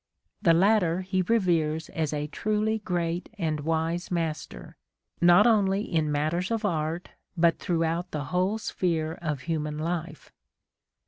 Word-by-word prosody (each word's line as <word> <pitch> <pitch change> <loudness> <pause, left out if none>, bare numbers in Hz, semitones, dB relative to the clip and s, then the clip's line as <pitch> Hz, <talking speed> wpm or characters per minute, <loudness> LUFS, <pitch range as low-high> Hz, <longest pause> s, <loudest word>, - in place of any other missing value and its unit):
The 165 -2 +5
latter 185 -2 +3
he 185 0 0
reveres 170 -6 +1
as 160 -3 -2
a 150 -1 -2
truly 215 +7 -1
great 175 -3 -2
and 160 -5 -1
wise 165 +3 -1
master, 165 -3 -4 0.5
not 175 +4 +7
only 205 -3 +3
in 160 -6 0
matters 155 +5 0
of 225 -2 -1
art, 165 -1 -2 0.3
but 170 0 +3
throughout 170 0 -1
the 150 -3 -3
whole 185 +4 +1
sphere 165 -6 -2
of 150 -5 -2
human 150 -1 -3
life." 165 +1 -4
170 Hz, 135 wpm, -27 LUFS, 160-185 Hz, 0.5 s, not